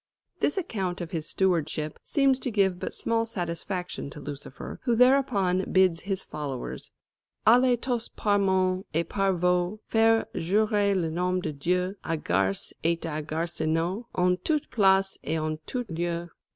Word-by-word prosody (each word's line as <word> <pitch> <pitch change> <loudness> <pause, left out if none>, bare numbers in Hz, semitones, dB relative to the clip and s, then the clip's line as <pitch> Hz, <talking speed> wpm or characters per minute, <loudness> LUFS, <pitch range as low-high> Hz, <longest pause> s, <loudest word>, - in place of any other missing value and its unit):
This 290 - +1
account 195 - -2
of 170 -2 -6
his 160 -3 -3
stewardship 165 -5 0
seems 275 -3 +2
to 255 - -2
give 195 -5 +1
but - - -4
small 230 0 0
satisfaction 180 -4 -4
to 150 - -10
Lucifer, 145 -2 -7
who 240 -3 +1
thereupon 225 -8 +3
bids 185 -3 +4
his 195 0 -3
followers 140 -4 -5 0.6
"Allez 245 +2 +6
tost 240 -3 -2
par 205 -2 +2
mons 185 -1 +2
et 165 +1 +1
par 195 -1 +1
vaulx 180 +2 +1
Faire 225 0 +3
jurer 205 +3 +2
le 165 -4 0
nom 180 +2 0
de 155 -4 -3
Dieu 180 +6 0
A 165 - -1
garses 95 - 0
et 165 +1 +2
à 155 -2 -3
garsonneaulx 165 +6 -1
En 180 0 +3
toute 305 -2 -1
place 195 -2 +3
et 160 +2 -1
en 155 0 -2
tout 250 -1 -3
lieu. 170 0 -3
185 Hz, 155 wpm, -27 LUFS, 165-210 Hz, 0.6 s, Allez